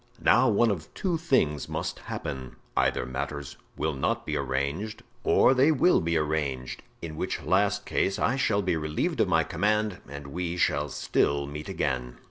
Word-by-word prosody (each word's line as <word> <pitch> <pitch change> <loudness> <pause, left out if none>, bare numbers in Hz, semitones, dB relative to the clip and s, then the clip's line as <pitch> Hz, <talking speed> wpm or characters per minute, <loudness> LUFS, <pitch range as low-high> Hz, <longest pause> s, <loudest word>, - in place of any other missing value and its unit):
Now 130 - +5
one 115 +1 +4
of 85 -6 -5
two 180 -5 0
things 130 - +1
must - - -3
happen: 65 -2 -6 0.2
either - - +2
matters 70 +2 -5 0.2
will 80 0 0
not 65 - -1
be - - -2
arranged, 70 +11 -2 0.2
or - - +5
they 135 +4 +5
will 160 +5 +4
be 85 0 +1
arranged, 75 -5 -2 0.2
in 80 -2 -5
which - - -3
last - - +2
case 95 - 0
I 125 - +1
shall 105 -6 +1
be 90 -2 +1
relieved 75 -1 -1
of - - +3
my - - +3
command 105 -2 0
and 70 0 -7
we 85 +4 -3
shall 75 -4 +1
still 70 +1 +1
meet 75 +2 -7
again." 60 -2 -2
80 Hz, 170 wpm, -27 LUFS, 70-105 Hz, 0.2 s, Now